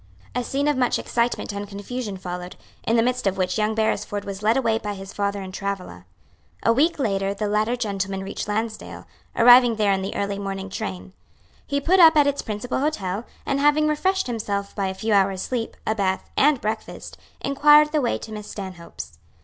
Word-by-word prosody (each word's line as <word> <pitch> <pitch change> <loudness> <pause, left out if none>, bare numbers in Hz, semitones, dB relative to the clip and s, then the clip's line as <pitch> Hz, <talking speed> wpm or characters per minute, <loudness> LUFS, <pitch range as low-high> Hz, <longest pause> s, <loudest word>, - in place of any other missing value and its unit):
A 250 - -1
scene 280 +4 -1
of 295 - +2
much 255 -1 +2
excitement 235 -1 -1
and 200 0 -5
confusion 205 +1 -5
followed, 180 -1 -6 0.3
in 225 - +3
the 230 - +4
midst 250 -2 0
of 190 0 0
which 185 +2 0
young 215 +1 +1
Beresford 205 -2 -1
was 200 0 -6
led 220 +4 +3
away 225 -4 +1
by 210 -2 -4
his 195 0 -9
father 200 -1 -2
and 185 0 -8
Travilla. 190 - -5 0.6
A 230 - +4
week 310 +8 +2
later 195 -6 0
the 210 +1 -2
latter 215 +3 +1
gentleman 195 -4 -3
reached 195 - -5
Lansdale, 220 +1 -4 0.3
arriving 245 0 +7
there 210 -2 +2
in 190 - -1
the 190 - -4
early 200 0 -2
morning 195 -1 -5
train. 195 -2 -5 0.5
He 280 -1 0
put 360 +7 +3
up 325 -2 +8
at 295 - +6
its 285 0 0
principal 220 +5 -3
hotel, 220 -8 -2 0.2
and 275 0 0
having 295 +1 +4
refreshed 380 +6 +1
himself 205 -4 -3
by 195 -2 -1
a 190 - -4
few 220 +2 -1
hours' 195 -1 +2
sleep, 240 -3 -3
a 220 - +1
bath, 190 -3 -1
and 285 -1 +4
breakfast, 215 0 -5 0.2
inquired 295 +2 +5
the 305 -1 +1
way 240 - 0
to 220 - -10
Miss 210 -1 -7
Stanhope's. 175 - -8
215 Hz, 200 wpm, -23 LUFS, 195-250 Hz, 0.6 s, up